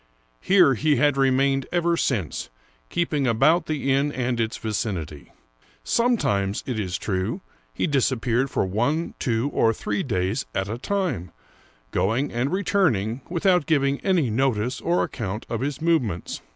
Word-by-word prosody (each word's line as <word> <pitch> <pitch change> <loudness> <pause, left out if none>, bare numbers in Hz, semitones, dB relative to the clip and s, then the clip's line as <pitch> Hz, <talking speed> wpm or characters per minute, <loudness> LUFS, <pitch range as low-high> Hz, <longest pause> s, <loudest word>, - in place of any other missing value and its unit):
Here 185 -8 +5
he 150 +4 +2
had 145 -1 +3
remained 135 0 +2
ever 170 -1 +2
since, 110 - -2 0.4
keeping 150 -5 0
about 155 +9 +3
the 145 -3 -1
inn 140 +2 +2
and 125 -3 -2
its 115 -1 -1
vicinity. 95 - -4 0.5
Sometimes, 105 - +1
it 125 -4 -3
is 90 -4 -2
true, 95 -2 -2 0.3
he - - -1
disap 135 -4 +1
peared 125 +3 +1
for - - 0
one, 120 - -1
two, 120 +2 0
or 115 - +3
three 105 -1 -2
days 100 +1 -1
at 95 0 -1
a 110 +3 -4
time, 175 - -2 0.6
going 115 +9 0
and 125 +5 -1
re 195 +2 -1
turning 125 - +1
without 180 -2 +2
giving 140 -3 +2
any 175 - +1
notice 125 0 0
or 175 +1 +1
account 105 -2 -4
of 115 0 -2
his 140 0 -2
move 165 -1 +4
ments. 95 -8 -5
130 Hz, 155 wpm, -24 LUFS, 110-155 Hz, 0.6 s, Here